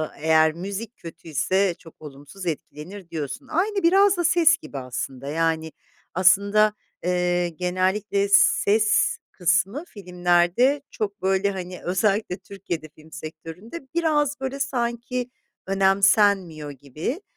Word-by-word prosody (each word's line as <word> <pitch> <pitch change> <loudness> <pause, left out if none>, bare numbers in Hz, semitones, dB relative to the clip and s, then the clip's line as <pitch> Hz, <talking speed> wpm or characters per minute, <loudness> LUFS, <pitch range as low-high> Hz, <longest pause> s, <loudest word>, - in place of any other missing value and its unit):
eee, - - -16
eğer 160 0 +5
müzik 200 +6 -6
kötü 165 0 -12
ise 185 +5 +1
çok 165 -2 -17
olumsuz 145 +6 -11
etkilenir, 170 +3 -6
diyorsun. 165 - -5
Aynı 395 +6 0
biraz 390 +2 +5
da 345 - 0
ses 340 0 +4
gibi 140 - -10
aslında. 130 +1 -5
Yani, 160 +1 -1 0.4
aslında, 200 +4 +4 0.3
eee, 180 0 +1
genellikle 185 +4 0
ses 210 +1 +4
kısmı 190 - 0
filmlerde 180 - +1
çok 200 -2 -4
böyle, 195 +1 +1
hani, 180 -1 -7
özellikle 195 +1 0
Türkiye'de 175 -5 -7
film 155 +1 -18
sektöründe 170 - -9
biraz, 295 -4 +1
böyle, 270 +1 -4
sanki 245 -1 -2 0.4
önemsenmiyor 195 -5 +2
gibi, 150 - -5
190 Hz, 120 wpm, -24 LUFS, 165-230 Hz, 0.4 s, eğer